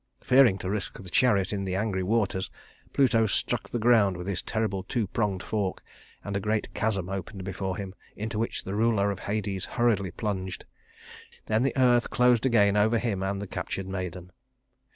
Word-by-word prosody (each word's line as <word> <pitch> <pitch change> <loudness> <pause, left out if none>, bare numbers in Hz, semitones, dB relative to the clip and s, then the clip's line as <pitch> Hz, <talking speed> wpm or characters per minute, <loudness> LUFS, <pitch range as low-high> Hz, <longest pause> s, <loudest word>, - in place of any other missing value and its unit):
Fearing 125 -6 +5
to 95 - -4
risk 105 -2 -2
the 90 -2 -10
chariot 105 -7 +3
in 100 -1 -2
the 95 -1 -2
angry 100 -1 -1
waters, 95 -1 0 0.4
Pluto 115 -5 +3
struck 100 - -1
the - - -2
ground 110 -5 +4
with 90 - -6
his 95 -3 -2
terrible 110 -4 -1
two 110 +4 -1
pronged 100 -2 -1
fork, 100 -4 -2 0.4
and 100 -1 -4
a - - +1
great 105 +1 -1
chasm 100 -5 -1
opened 95 +1 -5
before 95 0 -3
him, 95 -2 -6 0.2
into 110 +1 -3
which 115 - -2
the 95 - -5
ruler 105 -2 +2
of 100 - -5
Hades 100 -2 -2
hurriedly 115 -6 +2
plunged. 95 -2 -4 0.8
Then 110 +1 +1
the 135 +1 0
earth 120 -2 +4
closed 125 0 +3
again 100 -5 +4
over 110 +3 +3
him 110 -5 -1
and 100 +1 -1
the 100 - -4
captured 95 0 -4
maiden. 90 -2 -5
100 Hz, 180 wpm, -27 LUFS, 95-115 Hz, 0.8 s, Fearing